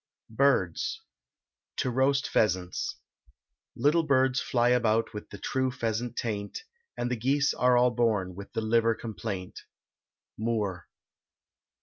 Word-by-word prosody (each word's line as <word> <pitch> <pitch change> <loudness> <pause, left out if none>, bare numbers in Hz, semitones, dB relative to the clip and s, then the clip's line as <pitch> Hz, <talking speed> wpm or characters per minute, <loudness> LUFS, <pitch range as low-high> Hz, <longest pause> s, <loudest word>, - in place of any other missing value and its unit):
BIRDS. 440 0 +1 0.7
TO 130 - 0
ROAST 135 +3 +2
PHEASANTS. 90 -4 0 0.8
Little 155 +4 +3
birds 130 -4 +2
fly 120 -1 +2
about 115 -2 +2
with 105 - -7
the 100 - -9
true 130 +6 -1
pheasant 120 -2 -3
taint, 105 - -4 0.3
And 120 +1 -2
the - - +1
geese 140 +5 +1
are 125 -1 +3
all 125 0 +4
born 110 -6 +1
with 100 +2 -10
the - - -1
liver[56 115 +1 +2
*] - - -24
complaint. 105 -5 -5 0.8
MOORE. 105 -6 -2
115 Hz, 125 wpm, -28 LUFS, 110-130 Hz, 0.8 s, all